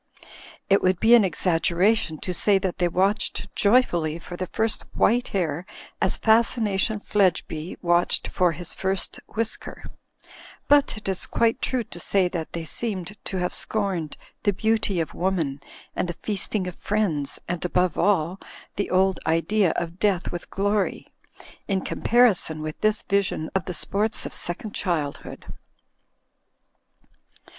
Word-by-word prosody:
It 195 - +4
would 185 -1 +2
be 225 +2 +5
an 235 -3 +8
exaggeration 180 +1 +1
to 180 - -3
say 200 +3 +3
that 190 -1 -3
they 175 - +3
watched 195 +3 0
joyfully 175 -8 +3
for 175 +1 -9
the 185 +1 -4
first 220 +3 -1
white 245 +2 +3
hair 170 -4 -1 0.4
as - - +2
Fas 225 +1 +4
cination 210 -1 0
Fledgeby 180 -4 0
watched 175 0 +2
for 180 -2 +1
his 175 +1 -6
first 190 0 -2 0.2
whisker; 225 0 -3 0.8
but 285 -5 +4
it 215 - -9
is 190 -2 0
quite 230 +2 +1
true 255 -2 0
to 175 - -8
say 190 +1 +2
that 165 -3 -5
they 170 -1 -4
seemed 195 +2 -3
to 190 - -3
have 180 0 -1
scorned 190 -8 -2 0.2
the 205 - +2
beauty 215 -2 0
of 165 - -2
woman 165 -7 -1 0.3
and 180 - -1
the - - -2
feasting 205 -1 -1
of 180 - -4
friends 185 -10 -1
and, 175 -1 -3
above 180 -1 +1
all, 185 -1 +1 0.4
the 200 - -1
old 190 +1 +2
idea 175 +4 +2
of 170 +1 -4
death 195 -4 +1
with 175 - -6
glory; 205 0 -1 0.5
in 195 -2 +1
compari 240 +3 +3
son 155 -2 -3
with 155 0 -6
this 215 0 +2
vision 195 -5 0
of 190 -4 0
the 180 - -4
sports 210 +7 0
of - - -6
second 200 +5 -3
childhood. 155 -7 -3
190 Hz, 150 wpm, -24 LUFS, 175-210 Hz, 0.8 s, an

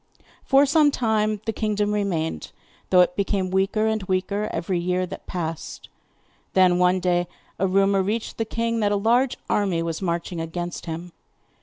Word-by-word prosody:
For 275 +1 +5
some 295 +1 +4
time 215 -5 0
the 225 - -1
kingdom 210 -1 0
remained, 170 - -2 0.4
though 180 -1 +6
it 180 0 +2
became 195 -2 -1
weaker 195 +3 +1
and 220 -1 0
weaker 195 +3 -1
every 175 +1 -2
year 180 +1 0
that 180 - -9
passed. 165 -3 -5 0.6
Then, 180 -1 +4
one 180 +1 +3
day, 175 -1 +1 0.3
a 195 - +2
rumour 195 +1 +3
reached 215 +5 -3
the 225 - 0
king 230 +1 -1
that 205 -2 +1
a - - +2
large 240 +5 +2
army 190 -5 +1
was 165 +1 -3
marching 170 -1 -2
against 175 +2 -5
him. 165 +2 -5
195 Hz, 165 wpm, -24 LUFS, 180-215 Hz, 0.6 s, though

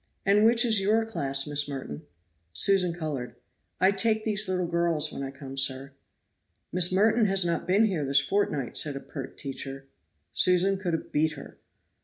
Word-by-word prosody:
"And 200 +2 +4
which 235 +2 +5
is 220 -4 +4
your 220 +3 +2
class, 135 -11 -1
Miss 145 -1 -1
Merton?" 130 - -7 0.5
Susan 185 - +2
colored. 150 -8 -5 0.4
"I 190 +2 +4
take 220 +2 0
these 215 -1 +2
little 180 -1 -1
girls 170 -3 -1
when - - -6
I 135 - -4
come, 135 0 -10
sir. 135 0 +1 0.8
"Miss 180 0 +2
Merton 215 +3 +3
has 195 -2 +1
not 170 -1 -2
been 200 +5 +4
here 180 -8 -1
this 140 0 +3
fortnight," 150 - -2
said 145 -2 -1
a - - -4
pert 135 -2 -9
teacher. 135 -1 -6 0.5
Susan 185 +2 +3
could 180 -3 -3
have 165 - -4
beat 155 +1 +1
her. 140 - -12
170 Hz, 175 wpm, -27 LUFS, 140-195 Hz, 0.8 s, which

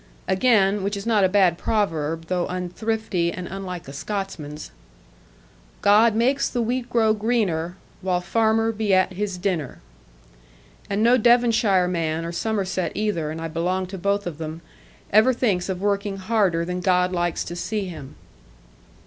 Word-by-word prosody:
And 190 - +2
again, 205 -5 +3
which 200 +1 -2
is 200 - -7
not 220 -3 +3
a 190 - +4
bad 185 -4 +3
proverb, 165 -7 -1
though 180 +1 -1
unthrifty 185 0 -2
and 180 0 -6
unlike 185 -4 -6
a 140 - -8
Scotsman's, 155 - -5 1.1
God 215 +2 +5
makes 255 +5 +2
the 245 - -3
wheat 245 +1 -1
grow 225 -3 +3
greener, 200 -6 -1 0.2
While 180 -1 0
farmer 225 +3 +2
be 215 -3 +1
at 185 0 +2
his 195 0 -3
dinner. 175 -7 -2 1.1
And 200 +2 0
no 240 +2 +5
Devonshire 225 -5 +4
man, 165 -2 -1
or 170 - -4
Somerset 190 -3 -2
either 205 -8 -1
(and 160 +1 -5
I 165 - -3
belong 180 +4 -1
to - - -4
both 200 +2 0
of 165 -3 -6
them), 160 +1 -6 0.5
ever 230 +5 +5
thinks 200 -7 0
of 185 -1 -3
working 200 0 -1
harder 190 -4 +1
than 180 +1 -3
God 180 -1 +2
likes 175 -2 -1
to 175 - -7
see 205 +3 -3
him. 155 -7 -9
190 Hz, 160 wpm, -23 LUFS, 175-215 Hz, 1.1 s, God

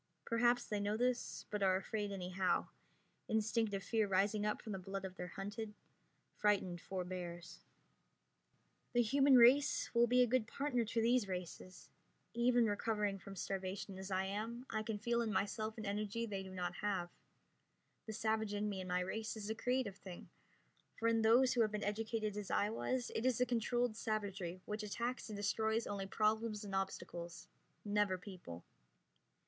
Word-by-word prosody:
Perhaps 240 +1 +3
they 210 - -2
know 205 +1 0
this, 250 +1 0
but 210 -1 -2
are 190 -1 +4
afraid 205 +2 -2
anyhow, 185 -1 0 0.6
instinctive 220 -2 +1
fear 220 -1 +1
rising 205 +2 +2
up 210 - 0
from 220 - -7
the 195 - -3
blood 195 +1 -5
of 185 -1 -6
their 180 -1 -5
hunted, 205 +4 -5 0.6
frightened 195 -4 +1
forebears. 180 -2 -5 1.3
The 240 0 +5
human 275 +4 +5
race 255 +4 +5
will 235 0 +5
be 250 +1 +5
a - - +5
good 240 -1 +1
partner 250 -2 0
to 230 +1 0
these 235 -2 +3
races. 180 0 -6 0.4
Even 240 0 +4
recovering 210 -1 0
from 195 +1 -9
starvation 190 +1 -4
as 190 0 -6
I 190 0 +1
am, 225 +5 -4
I 215 - 0
can 215 -1 -3
feel 235 +2 +1
in 225 -2 -1
myself 215 +1 -1
an 215 - -5
energy 210 +3 -1
they 200 -3 -3
do 190 - -8
not 180 -1 -3
have. 190 -4 -1 1.0
The 220 - -4
savage 220 -1 0
in 205 +1 0
me 200 -2 -3
and 185 - -6
my 180 0 +1
race 220 +5 -3
is 215 0 -4
a - - +1
creative 245 -3 -1
thing, 180 -3 -10 0.7
for 230 - +2
in 225 -1 +3
those 240 +4 +5
who 240 - +3
have 215 -2 +3
been 210 -1 -2
educated 215 0 -1
as 205 -2 -4
I 205 +1 +2
was 245 +2 -1
it 225 - -1
is 255 -2 +2
a 250 - +4
controlled 240 -1 +1
savagery 200 -5 -3
which 210 +1 -3
attacks 235 +4 -3
and 210 - -5
destroys 220 +2 +1
only 195 -1 -3
problems 215 +1 +1
and 200 -2 -6
obstacles, 180 -2 -4 0.4
never 205 -2 +2
people. 180 - -9
210 Hz, 175 wpm, -37 LUFS, 195-230 Hz, 1.3 s, The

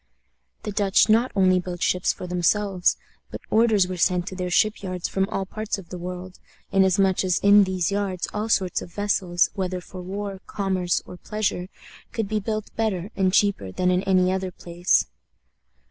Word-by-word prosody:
The 210 - -4
Dutch 200 +1 +3
not 230 +4 +4
only 185 -1 +4
built 180 -1 -5
ships 180 0 +2
for - - -8
themselves, 180 +1 +1 0.3
but - - -7
orders 220 -4 +4
were 185 0 -5
sent 175 0 +2
to 185 - -8
their 180 -1 -3
ship 215 +4 +2
yards 185 -3 -3
from 195 +1 -1
all 195 -3 -2
parts 215 +2 -4
of 185 -4 -11
the 180 - -7
world, 180 +1 -7 0.3
inasmuch 190 0 +3
as 185 -2 +1
in 200 0 +6
these 185 -1 -1
yards 195 -3 -2
all 215 +2 -2
sorts 185 -4 +1
of 175 - -9
vessels, 185 -3 +1
whether 185 -2 -2
for 185 +1 -10
war, 195 +1 -5
commerce, 190 -3 -1
or 180 - -10
pleasure, 195 -2 -2 0.5
could 225 -3 -2
be 215 +1 -1
built 215 +1 -4
better 210 -3 -1
and 190 -1 +2
cheaper 195 - +1
than 180 - +1
in 180 0 +2
any 185 -1 +3
other 190 0 -2
place. 175 0 +1
190 Hz, 180 wpm, -24 LUFS, 180-205 Hz, 0.5 s, in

